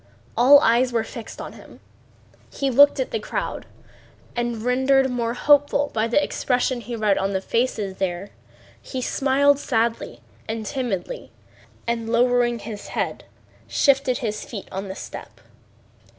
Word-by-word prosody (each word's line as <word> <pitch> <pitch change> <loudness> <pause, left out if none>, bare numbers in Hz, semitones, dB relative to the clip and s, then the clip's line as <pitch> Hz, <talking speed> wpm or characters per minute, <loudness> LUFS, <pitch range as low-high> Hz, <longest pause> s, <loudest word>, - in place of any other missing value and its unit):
All 275 +4 +8
eyes 245 +1 +3
were 230 -2 +1
fixed 225 0 -9
on - - -7
him. - - -15 0.7
He 275 -1 -1
looked 285 +3 +6
at - - -2
the - - -1
crowd, - - -4 0.7
and 240 -2 -2
rendered 265 +2 +3
more 235 -1 -1
hopeful 290 +1 +3
by 220 +1 +1
the 240 +6 +2
expression 250 -1 0
he 235 +2 -6
read 210 -3 +1
on 195 +1 -1
the 190 - +1
faces 210 -2 -1
there, 190 +1 -3 0.5
he 260 - -5
smiled 275 +2 +2
sadly 230 -3 -1 0.3
and 220 -1 -3
timidly, 255 - -4 0.5
and 230 -1 -2
lowering 240 0 +3
his 210 -2 -8
head - - -3 0.4
shifted 270 -2 +2
his 215 -4 -3
feet 205 -5 -8
on 195 +1 -4
the 190 - -6
step. - - -9
240 Hz, 145 wpm, -23 LUFS, 220-265 Hz, 0.7 s, All